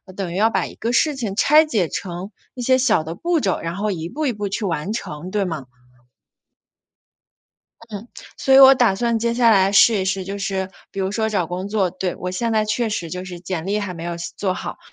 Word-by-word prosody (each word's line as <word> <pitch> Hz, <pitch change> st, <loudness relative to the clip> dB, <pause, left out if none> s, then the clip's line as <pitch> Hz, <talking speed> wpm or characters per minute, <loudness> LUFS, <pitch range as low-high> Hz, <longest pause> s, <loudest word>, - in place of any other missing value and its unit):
等 190 Hz, -4 st, -4 dB
于 -, -, -5 dB
要 215 Hz, +4 st, +3 dB
把 -, -, 0 dB
一 -, -, -9 dB
个 230 Hz, -, -3 dB
事 295 Hz, +5 st, +2 dB
情 220 Hz, -7 st, -4 dB
拆 300 Hz, +8 st, +5 dB
解 215 Hz, -, 0 dB
成 185 Hz, +2 st, -5 dB, 0.2 s
一 250 Hz, -, -5 dB
些 260 Hz, +1 st, +3 dB
小 225 Hz, -10 st, +2 dB
的 160 Hz, +1 st, -5 dB
步 340 Hz, -, 0 dB
骤， 195 Hz, -9 st, 0 dB
然 165 Hz, +1 st, -4 dB
后 210 Hz, +2 st, -1 dB
一 165 Hz, -3 st, -4 dB
步 305 Hz, +9 st, -3 dB
一 255 Hz, -, +1 dB
步 205 Hz, -1 st, -4 dB
去 200 Hz, +2 st, -3 dB
完 170 Hz, +1 st, -2 dB
成， 170 Hz, -5 st, -6 dB
对 200 Hz, 0 st, 0 dB
吗？ 160 Hz, -7 st, -4 dB, 2.2 s
嗯， 205 Hz, -2 st, -5 dB, 0.4 s
所 265 Hz, -, +3 dB
以 -, -, +9 dB
我 270 Hz, 0 st, +10 dB
打 240 Hz, -6 st, +3 dB
算 230 Hz, +2 st, 0 dB
接 235 Hz, +1 st, 0 dB
下 235 Hz, -1 st, +4 dB
来 195 Hz, -2 st, +4 dB
试 205 Hz, +1 st, +5 dB
一 -, -, -1 dB
试， 190 Hz, 0 st, -1 dB
就 200 Hz, +2 st, -5 dB
是 195 Hz, -1 st, -2 dB, 0.2 s
比 -, -, -9 dB
如 190 Hz, +1 st, -1 dB
说 220 Hz, 0 st, 0 dB
找 195 Hz, -6 st, 0 dB
工 180 Hz, +4 st, -5 dB
作。 200 Hz, -4 st, +1 dB
对， 185 Hz, 0 st, -4 dB
我 180 Hz, -, -4 dB
现 230 Hz, +6 st, -2 dB
在 215 Hz, -1 st, +2 dB
确 215 Hz, +2 st, -1 dB
实 175 Hz, -6 st, -4 dB
就 180 Hz, +1 st, -5 dB
是 180 Hz, -1 st, -8 dB
简 175 Hz, -1 st, -5 dB
历 205 Hz, +2 st, 0 dB
还 205 Hz, -3 st, -4 dB
没 165 Hz, -2 st, -8 dB
有 170 Hz, 0 st, -4 dB
写 170 Hz, 0 st, -6 dB
做 190 Hz, -2 st, -1 dB
好， -, -, -6 dB
200 Hz, 255 characters per minute, -21 LUFS, 180-230 Hz, 2.2 s, 我